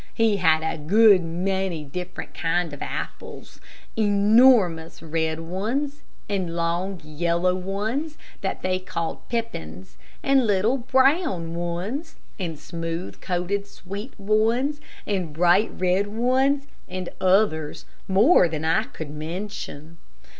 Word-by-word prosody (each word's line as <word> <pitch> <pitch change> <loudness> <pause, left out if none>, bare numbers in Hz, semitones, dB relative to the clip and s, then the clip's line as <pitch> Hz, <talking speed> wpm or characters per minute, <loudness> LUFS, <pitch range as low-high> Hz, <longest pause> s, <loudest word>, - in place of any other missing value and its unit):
He 225 -3 +3
had 160 -4 +3
a 160 0 -2
good 200 +4 +5
many 180 0 -2
different 180 +5 -7
kind 165 -1 -1
of 145 - -9
apples. - - -6 0.3
Enormous 205 -5 +4
red 160 0 -1
ones, 235 - -2 0.3
and 185 -5 -2
long, 175 +3 -1
yellow 170 +4 0
ones 215 - -3 0.2
that - - -3
they 185 0 +1
called 170 -3 -5
pippins, 90 - -5 0.3
and 270 -3 +3
little 210 +6 +2
brown 260 - +2
ones, 180 - -4 0.2
and 165 -4 -3
smooth 165 +3 -5
coated 190 +3 -2
sweet 200 +6 -8
ones, 225 +8 +1 0.2
and 185 -7 -2
bright 175 +6 +4
red 185 +2 +2
ones, 260 +6 +1 0.2
and 185 -1 -4
others, 185 -5 +2 0.2
more 195 - +5
than 155 -1 -3
I 160 - +2
could 155 -2 -8
mention. 160 -1 -6
185 Hz, 120 wpm, -24 LUFS, 165-220 Hz, 0.3 s, good